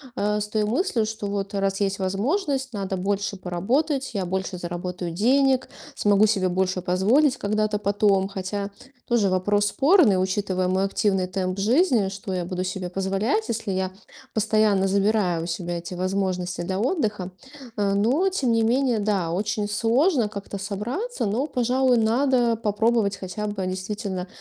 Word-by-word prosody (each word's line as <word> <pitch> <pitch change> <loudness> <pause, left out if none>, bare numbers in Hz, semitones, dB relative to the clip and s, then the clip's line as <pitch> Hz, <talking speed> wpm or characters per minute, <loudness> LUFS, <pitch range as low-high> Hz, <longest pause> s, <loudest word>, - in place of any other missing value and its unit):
э, 210 -1 0
с 210 - -2
той 215 0 0
мыслью, 235 - 0
что 220 -1 -4
вот, 200 0 -3
э, 200 - -1
раз 195 0 -1
есть 195 0 0
возможность, 265 - -1
надо 195 -2 -3
больше 200 +2 -1
поработать, 255 - -1
я 195 -3 -1
больше 190 +1 -3
заработаю 175 0 -5
денег, 260 +7 +2 0.3
смогу 205 +1 +4
себе 195 -3 +1
больше 185 0 0
позволить 225 - +3
когда-то 215 -1 0
потом. 200 -1 +2
Хотя 200 +1 -4 0.3
тоже 230 -5 +2
вопрос 205 +3 +1
спорный, 270 - +4
учитывая 185 -1 -1
мой 190 +1 +1
активный 195 -2 0
темп 185 +1 -3
жизни: 240 - +3
что 195 0 -6
я 180 -1 -2
буду 180 +1 -3
себе 185 -1 -4
позволять, 195 - -1
если 220 -3 -2
я 185 0 -1 0.4
постоянно 215 -2 +2
забираю 195 -3 +1
у - - -4
себя 175 0 -3
эти 170 +2 -8
возможности 185 -1 -2
для 185 +2 -2
отдыха? 210 - -1 0.4
А, 200 -2 +1
но, 260 - +2
тем 270 -11 0
не 230 - +3
менее, 245 0 +2
да, 200 -5 0
очень 205 +3 -1
сложно 235 - +2
как-то 200 -1 -8
собраться, 225 - -3
но, 230 +8 0
пожалуй, 255 -1 +2
надо 240 +1 +2
попробовать 215 -1 +1
хотя 195 +2 -5
бы 200 -2 -3
действительно 185 0 -4
205 Hz, 155 wpm, -24 LUFS, 190-230 Hz, 0.4 s, смогу